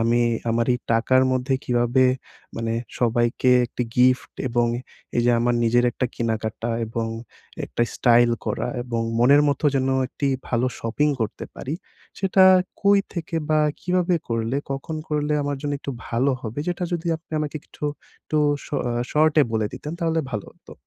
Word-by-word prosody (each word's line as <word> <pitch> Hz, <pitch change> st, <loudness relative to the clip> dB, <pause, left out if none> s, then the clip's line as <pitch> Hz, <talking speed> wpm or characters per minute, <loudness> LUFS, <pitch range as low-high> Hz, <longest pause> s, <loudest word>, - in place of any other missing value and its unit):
আমি 115 Hz, +1 st, +2 dB, 0.3 s
আমার 115 Hz, 0 st, +1 dB
এই -, -, -2 dB
টাকার 130 Hz, +3 st, +3 dB
মধ্যে 130 Hz, +1 st, 0 dB
কীভাবে 120 Hz, +1 st, +2 dB, 0.5 s
মানে 115 Hz, 0 st, -2 dB, 0.3 s
সবাইকে 120 Hz, +1 st, +2 dB, 0.2 s
একটি 125 Hz, -, -4 dB
গিফট 125 Hz, +1 st, +3 dB, 0.2 s
এবং 120 Hz, 0 st, +2 dB, 0.5 s
এই 120 Hz, -, +3 dB
যে 120 Hz, -, +5 dB
আমার 120 Hz, 0 st, +2 dB
নিজের 120 Hz, +1 st, +3 dB
একটা 130 Hz, -, -1 dB
কেনা-কাটা 110 Hz, 0 st, -2 dB, 0.2 s
এবং 115 Hz, 0 st, -3 dB, 0.6 s
একটা 120 Hz, -, -1 dB
স্টাইল 120 Hz, -1 st, +5 dB, 0.2 s
করা 115 Hz, +2 st, -1 dB
এবং 120 Hz, -2 st, -2 dB, 0.2 s
মনের 140 Hz, +5 st, +6 dB
মতো 140 Hz, +2 st, -1 dB
যেন 130 Hz, 0 st, +1 dB, 0.2 s
একটি 140 Hz, +1 st, -2 dB, 0.2 s
ভালো 120 Hz, +1 st, +1 dB
শপিং 135 Hz, +7 st, +1 dB
করতে 110 Hz, -, -3 dB
পারি। 145 Hz, +4 st, -4 dB, 0.4 s
সেটা 190 Hz, 0 st, +4 dB, 0.4 s
কই 200 Hz, 0 st, +5 dB, 0.2 s
থেকে 165 Hz, -1 st, -4 dB
বা 155 Hz, 0 st, +4 dB, 0.2 s
কীভাবে 180 Hz, 0 st, +1 dB
করলে 115 Hz, +3 st, -1 dB, 0.2 s
কখন 145 Hz, +4 st, -4 dB
করলে 150 Hz, 0 st, 0 dB
আমার 145 Hz, -1 st, -2 dB
জন্য 145 Hz, -1 st, -2 dB
একটু 140 Hz, -, -5 dB, 0.2 s
ভালো 125 Hz, +4 st, +1 dB
হবে 115 Hz, +5 st, -5 dB
যেটা 175 Hz, 0 st, -1 dB
যদি 170 Hz, 0 st, -2 dB
আপনি 160 Hz, 0 st, -22 dB
আমাকে 150 Hz, 0 st, -3 dB
কিছু -, -, -10 dB, 0.4 s
একটু 155 Hz, -, -3 dB, 0.3 s
শ -, -, -12 dB, 0.4 s
শর্টে 155 Hz, 0 st, +4 dB
বলে 110 Hz, -1 st, +1 dB
দিতেন 150 Hz, -, -6 dB
তাহলে 165 Hz, -1 st, +1 dB
ভালো 105 Hz, -2 st, -3 dB
হতো। -, -, -16 dB
125 Hz, 160 wpm, -23 LUFS, 115-150 Hz, 0.6 s, মনের